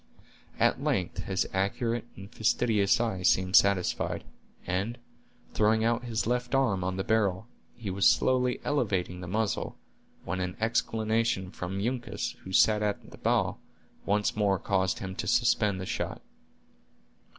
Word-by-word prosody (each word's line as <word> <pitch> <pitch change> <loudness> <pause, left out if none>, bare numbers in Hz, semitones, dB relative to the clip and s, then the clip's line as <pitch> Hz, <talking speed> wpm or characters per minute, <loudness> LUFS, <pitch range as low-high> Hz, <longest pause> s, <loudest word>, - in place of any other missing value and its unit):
At - - +2
length 90 -3 -1
his 95 -1 0
accurate 115 +5 -1
and 95 0 -10
fastidious 110 -3 +2
eye 110 -6 -1
seemed 95 0 +2
satisfied, 100 -3 +3 0.4
and, 95 +7 -2 0.6
throwing 110 +1 +3
out 120 +2 +1
his 115 -1 -1
left 125 +2 0
arm 110 -9 +2
on 95 +1 -2
the 95 - -1
barrel, 100 -3 +1 0.3
he 110 -5 -5
was 95 +1 +3
slowly 125 -1 +2
elevating 95 -10 -1
the 90 - -7
muzzle, 110 +3 -2 0.5
when 95 +2 -2
an 90 0 -3
exclamation 110 -3 0
from 95 +1 -5
Uncas, 120 +3 -2
who 95 - -8
sat 105 +2 +4
in 105 -1 -2
the - - -13
bow, - - +1 0.5
once 105 +1 +1
more 100 -2 +2
caused 95 -1 0
him 95 -1 -5
to - - -3
suspend 110 -4 +2
the 95 - -4
shot. - - -4
105 Hz, 145 wpm, -29 LUFS, 95-115 Hz, 0.6 s, sat